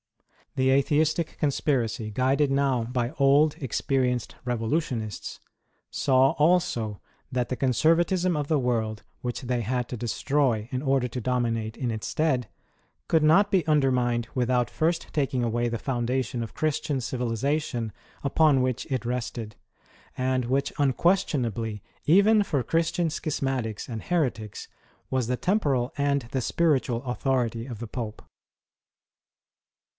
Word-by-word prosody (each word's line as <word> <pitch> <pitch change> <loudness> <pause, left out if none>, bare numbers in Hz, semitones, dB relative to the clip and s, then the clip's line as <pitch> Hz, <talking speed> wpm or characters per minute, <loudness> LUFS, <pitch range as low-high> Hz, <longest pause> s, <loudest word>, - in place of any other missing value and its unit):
The 130 0 +3
Atheistic 155 +4 +1
conspiracy, 130 -7 0
guided 135 +6 +1
now 135 -3 +2
by 120 +1 -2
old, 145 +1 +4
experienced 125 -1 -1
revolutionists, 120 - -2 0.5
saw 135 0 +3
also 150 - +1 0.3
that 125 -2 0
the 130 - -2
conservatism 170 - +2
of 145 -1 -2
the 155 -3 +3
world 110 -4 -1 0.2
which 120 -1 -3
they 125 -1 -1
had 125 +2 -1
to - - -4
destroy 120 -1 0
in 130 -1 -2
order 135 -3 +1
to 125 +1 -5
dominate 115 -2 -1
in 125 - -2
its 110 -2 -3
stead, 135 -7 0 0.6
could 160 -2 +3
not 185 +7 +5
be 185 -5 +2
undermined 125 -6 +2
without 125 -1 +1
first 165 +1 0
taking 135 -4 0
away 120 +1 0
the 115 - -2
foundation 125 -1 -1
of 115 - -9
Christian 155 -2 -1
civilization 125 0 -2 0.3
upon 145 -1 +4
which 130 -1 -1
it 130 -3 -1
rested, 115 -3 -4 0.6
and 130 -1 0
which 135 +3 0
unquestion 145 0 +2
ably, 110 -2 -4 0.2
even 205 +6 +5
for 145 -8 0
Christian 165 +5 0
schismatics 135 - -2
and 115 -3 -5
heretics, 125 - -2 0.4
was 130 -3 0
the 125 +1 0
temporal 140 - +1
and 140 -1 +1
the 130 - -1
spiritual 130 -5 +1
authority 125 -2 -1
of 120 -5 -7
the 120 - -5
Pope. 110 -1 -6
130 Hz, 130 wpm, -26 LUFS, 120-145 Hz, 0.6 s, not